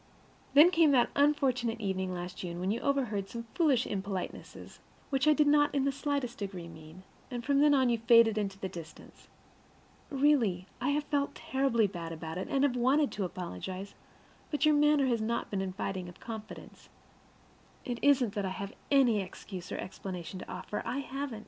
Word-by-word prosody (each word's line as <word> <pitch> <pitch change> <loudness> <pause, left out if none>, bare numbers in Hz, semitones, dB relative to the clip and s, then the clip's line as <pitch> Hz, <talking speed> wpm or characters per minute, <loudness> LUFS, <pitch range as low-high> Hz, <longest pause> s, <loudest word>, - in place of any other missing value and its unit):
And - - -27
then 350 - +5
came 330 -3 +5
that 245 -3 +3
unfortunate 265 -5 +2
evening 190 -3 -2
last 180 0 -6
June 175 -1 -5
when 185 +2 -1
you 230 - -2
overheard 240 -9 -1
some 230 +1 -6
foolish 285 -8 +3
impolitenesses, 195 -2 -6 0.3
which 270 +2 +1
I 305 - +7
did 300 0 +3
not 290 0 +3
in 275 -1 +2
the 280 - +2
slightest 280 -3 -3
degree 190 -4 -5
mean; 160 +2 -13 0.3
and 240 -2 -5
from 280 -1 +3
then 295 0 +5
on 260 -2 +3
you 235 -1 +1
faded 230 -1 +5
into 200 -2 -2
the 195 - -4
distance. 170 -3 -11 0.8
Really, 265 -11 +2 0.2
I 255 - +1
have 290 +1 +1
felt 285 -1 -1
terribly 265 -4 +1
bad 170 -4 -5
about 160 +1 -6
it, - - -4
and 275 0 +1
have 275 -3 +2
wanted 265 +4 +2
to 200 - -2
apologize, 185 - -6 0.6
but 300 0 0
your 305 - +5
manner 295 -1 +4
has 235 -4 +1
not 235 +2 -2
been 195 -2 -1
inviting 190 -1 -4
of 175 - -14
confidence. 220 -2 -9 1.0
It 240 -1 -3
isn't 260 -7 +3
that 205 - -2
I 190 - -1
have 200 +1 -6 0.2
any 250 -7 +4
excuse 185 -1 -8
or - - -3
explanation 185 -1 -6
to - - -9
offer; 185 +3 -5
I 255 - -3
haven't. 275 -3 -4
230 Hz, 185 wpm, -31 LUFS, 190-280 Hz, 1.0 s, I